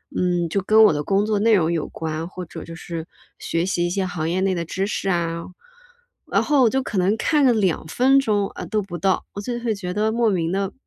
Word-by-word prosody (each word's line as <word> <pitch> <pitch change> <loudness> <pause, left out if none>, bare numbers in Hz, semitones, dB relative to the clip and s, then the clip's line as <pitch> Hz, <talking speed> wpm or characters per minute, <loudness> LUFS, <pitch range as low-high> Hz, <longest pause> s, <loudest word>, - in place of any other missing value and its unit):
嗯， 175 -2 0
就 200 - 0
跟 220 +3 +5
我 - - +6
的 150 0 -2
工 200 +4 +1
作 215 -1 0
内 225 +1 +4
容 170 -2 +2
有 165 -3 -1
关， 160 +1 -4
或 185 0 -7
者 - - -9
就 165 - -9
是 165 0 -6 0.3
学 165 +1 -1
习 175 -2 0
一 - - -1
些 190 0 -1
行 165 -3 -3
业 185 +2 0
内 190 -1 +1
的 170 -1 -3
知 190 +4 -2
识 205 - -3
啊， 170 -1 -1 0.8
然 - - +2
后 285 -4 +3
我 230 - +5
就 265 +2 0
可 210 - -4
能 190 +4 +2
看 295 +1 +2
了 245 - +5
2 190 -8 0
分 265 - +4
钟， 205 -6 +1
呃， - - -6
都 215 -1 0
不 180 -3 -7
到， 190 +3 +1
我 200 - -5
就 240 +3 -4
会 225 -3 -1
觉 180 -2 -5
得， 215 +1 +1
莫 230 0 +1
名 170 -3 0
地 195 0 -2
190 Hz, 265 characters per minute, -22 LUFS, 170-215 Hz, 0.8 s, 我